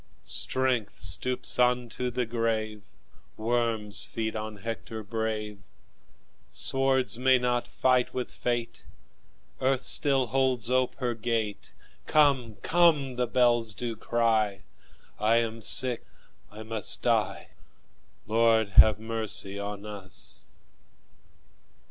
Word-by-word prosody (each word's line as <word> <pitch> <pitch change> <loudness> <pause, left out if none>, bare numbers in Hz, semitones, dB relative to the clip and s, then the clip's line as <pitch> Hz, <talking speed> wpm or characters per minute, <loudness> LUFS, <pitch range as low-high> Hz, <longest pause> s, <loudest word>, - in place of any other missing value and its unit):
Strength 120 - -1
stoops 125 +10 +1
unto 125 0 +1
the 125 0 -2
grave, 110 -3 -3 0.5
Worms 110 -4 -1
feed 110 -1 -4
on 110 0 -5
Hector 110 +1 -6
brave; 105 -1 -4 0.9
Swords 135 -3 +1
may 130 0 +4
not 125 -1 -1
fight 130 -1 +1
with 125 -1 -3
fate; 120 -1 -3 0.8
Earth 130 0 0
still 140 -4 +4
holds 125 -1 0
ope 130 0 +1
her 125 -3 -2
gate; 110 -3 -3 0.3
Come, 135 -7 +2
come! 160 -7 +3
the 125 0 -1
bells 120 -3 +2
do 115 +1 -4
cry; 110 -4 0 0.6
I 110 +2 +3
am 115 -1 -1
sick, 125 +2 +3 0.5
I 110 +1 -10
must 110 -2 0
die - - 0 0.8
Lord, 110 -1 +2
have 105 +2 +6
mercy 110 -3 -2
on 100 0 -6
us! 100 -3 -7
115 Hz, 105 wpm, -27 LUFS, 110-125 Hz, 0.9 s, have